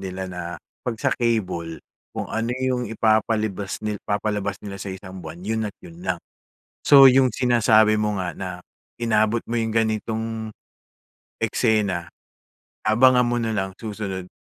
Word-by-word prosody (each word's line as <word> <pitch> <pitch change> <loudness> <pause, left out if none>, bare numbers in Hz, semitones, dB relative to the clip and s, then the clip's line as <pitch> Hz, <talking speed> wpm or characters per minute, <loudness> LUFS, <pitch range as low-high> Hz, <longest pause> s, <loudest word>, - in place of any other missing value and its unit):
nila 95 0 -5
na 90 - -5 0.4
'pag 125 -4 -3
sa 130 +3 +1
cable, 90 -9 -1 0.4
kung - - -2
ano 115 +1 -2
yung 130 -2 -1
ipapalibas 110 -2 0
ni 105 -1 -2
ipapalabas 105 -1 -2
nila 100 -1 -7
sa 100 - -5
isang 95 0 -8
buwan, 85 +2 -9
yun 110 0 -1
at 100 - -13
yun 170 0 -12
lang. 135 - -1 0.6
So, 140 -1 +8
yung 130 -1 +5
sinasabi 110 -4 +4
mo 105 -1 0
nga 90 -2 -2
na 95 +3 -5 0.5
inabot 110 -1 +1
mo 115 0 -1
yung 115 - -1
ganitong 110 0 -1 0.9
eksena, 105 -6 +1 0.8
abangan 125 +3 +5
mo 120 0 0
nalang 100 -4 -2
susunod 100 -3 -5
110 Hz, 140 wpm, -23 LUFS, 100-115 Hz, 0.9 s, So